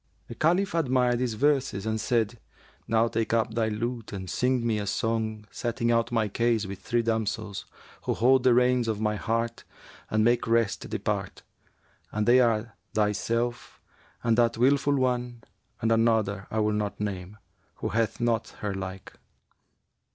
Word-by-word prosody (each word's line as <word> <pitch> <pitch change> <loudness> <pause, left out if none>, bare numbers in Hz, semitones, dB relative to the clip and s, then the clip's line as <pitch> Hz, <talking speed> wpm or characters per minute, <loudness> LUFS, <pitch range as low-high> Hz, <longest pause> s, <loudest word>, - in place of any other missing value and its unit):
The - - -5
Caliph 175 +9 +1
admired 125 -6 +2
these 125 -3 -1
verses 135 -6 +1
and 110 0 -1
said, 115 0 0 0.5
'Now, 115 0 +3
take 115 -1 -1
up 115 -1 +1
thy 115 -1 +1
lute 115 +2 -3
and 95 -2 -6
sing 125 +5 0
me 110 -2 +1
a 100 - -4
song 110 0 -1
setting 120 0 -1
out 115 0 +1
my 115 -2 +1
case 115 +1 +1
with 95 0 -7
three 120 +3 0
damsels 110 -2 -2 0.4
who - - 0
hold 130 +3 +4
the 125 -1 +4
reins 125 -1 +3
of 110 -2 -1
my 105 -1 0
heart 115 +2 -2 0.5
and 110 0 +2
make 120 +1 +2
rest 115 -2 +1
depart; - - -3 0.7
and 105 +1 -1
they 125 +2 +7
are 115 -2 +1 0.2
thyself 115 +3 -1 0.4
and 115 0 +2
that 115 -1 +3
wilful 140 +3 +3
one 125 -3 -1 0.4
and 115 - +2
another 110 -4 +2
I 110 - 0
will 105 0 +1
not 105 -1 -2
name, 100 -1 -4 0.4
who - - -3
hath 115 -1 0
not 120 -2 0
her 105 -2 -2
like.' 95 0 -6
115 Hz, 160 wpm, -27 LUFS, 110-120 Hz, 0.7 s, they